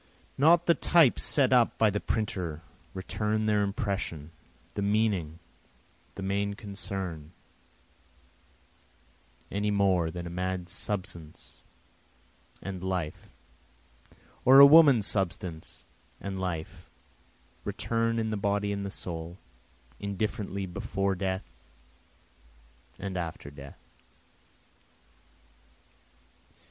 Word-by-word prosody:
Not 165 Hz, +5 st, +5 dB
the 170 Hz, -, +5 dB
types 165 Hz, -6 st, +4 dB
set 135 Hz, -3 st, +4 dB
up 120 Hz, -2 st, +4 dB
by 110 Hz, -2 st, +4 dB
the 105 Hz, -, -1 dB
printer 90 Hz, -9 st, -3 dB, 0.3 s
return 105 Hz, +3 st, -1 dB
their 105 Hz, -1 st, +2 dB
impression, 100 Hz, -6 st, -3 dB, 0.4 s
the 100 Hz, -, -3 dB
meaning, 100 Hz, -6 st, 0 dB, 0.8 s
the 100 Hz, -, -6 dB
main 100 Hz, +1 st, -1 dB
concern, 95 Hz, -6 st, -6 dB, 2.2 s
Any 105 Hz, +1 st, -1 dB
more 95 Hz, -5 st, +2 dB
than 85 Hz, +1 st, -6 dB
a -, -, -5 dB
man's 90 Hz, 0 st, -3 dB
substance 90 Hz, -6 st, -4 dB, 1.0 s
and 95 Hz, -2 st, -6 dB
life 90 Hz, -5 st, -3 dB, 1.1 s
or 135 Hz, +2 st, +8 dB
a 140 Hz, -, +12 dB
woman's 140 Hz, -7 st, +7 dB
substance 90 Hz, -5 st, -3 dB, 0.3 s
and 95 Hz, -1 st, -5 dB
life 85 Hz, -4 st, -5 dB, 0.7 s
return 115 Hz, 0 st, -1 dB
in 110 Hz, -1 st, -1 dB
the 105 Hz, -, -1 dB
body 100 Hz, 0 st, 0 dB
and 100 Hz, 0 st, -3 dB
the 100 Hz, -, -4 dB
soul, 85 Hz, -2 st, -6 dB, 0.6 s
Indifferently 100 Hz, -1 st, -3 dB
before 95 Hz, +2 st, -2 dB
death 95 Hz, -4 st, -5 dB, 1.3 s
and 95 Hz, -1 st, -5 dB
after 80 Hz, -4 st, -5 dB
death. 70 Hz, -1 st, -11 dB
100 Hz, 95 wpm, -29 LUFS, 90-105 Hz, 2.2 s, a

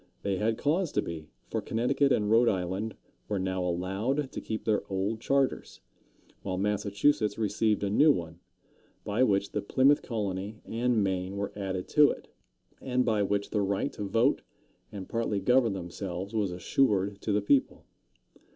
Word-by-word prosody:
They 100 Hz, -1 st, 0 dB
had 110 Hz, +3 st, 0 dB
cause 165 Hz, +3 st, 0 dB
to -, -, +2 dB
be, 80 Hz, -2 st, -7 dB, 0.2 s
for -, -, -1 dB
Connecticut 135 Hz, +5 st, +1 dB
and 105 Hz, -3 st, +2 dB
Rhode 115 Hz, +1 st, +5 dB
Island 95 Hz, +3 st, -2 dB, 0.3 s
were 105 Hz, -, -1 dB
now 95 Hz, -1 st, -1 dB
allowed 95 Hz, +11 st, -1 dB
to -, -, -5 dB
keep 110 Hz, -, -5 dB
their 105 Hz, -2 st, +2 dB
old 100 Hz, +4 st, -1 dB
charters, 135 Hz, -1 st, 0 dB, 0.6 s
while 95 Hz, -2 st, -3 dB
Massachusetts 105 Hz, +3 st, +1 dB
received 105 Hz, 0 st, +1 dB
a 100 Hz, -, 0 dB
new 150 Hz, +8 st, +6 dB
one, 85 Hz, -, -4 dB, 0.6 s
by 105 Hz, +4 st, -1 dB
which 100 Hz, -5 st, +2 dB
the -, -, -2 dB
Plymouth 135 Hz, +7 st, +3 dB
colony 105 Hz, -2 st, -4 dB
and 115 Hz, -1 st, +1 dB
Maine 95 Hz, 0 st, -2 dB
were 100 Hz, 0 st, -3 dB
added 95 Hz, -2 st, -4 dB
to 150 Hz, -1 st, +6 dB
it, -, -, -6 dB, 0.5 s
and 125 Hz, -1 st, 0 dB
by 110 Hz, -3 st, +2 dB
which 100 Hz, 0 st, -1 dB
the 105 Hz, -, +1 dB
right 100 Hz, 0 st, -1 dB
to -, -, -8 dB
vote 115 Hz, +7 st, +2 dB, 0.5 s
and 95 Hz, -2 st, -7 dB
partly 115 Hz, -3 st, -1 dB
govern 125 Hz, -1 st, +3 dB
themselves 95 Hz, +2 st, -5 dB
was 105 Hz, -4 st, 0 dB
assured 100 Hz, +1 st, +1 dB
to 110 Hz, -, -2 dB
the 105 Hz, -, +3 dB
people. 135 Hz, +5 st, +1 dB
105 Hz, 165 wpm, -29 LUFS, 95-115 Hz, 0.6 s, new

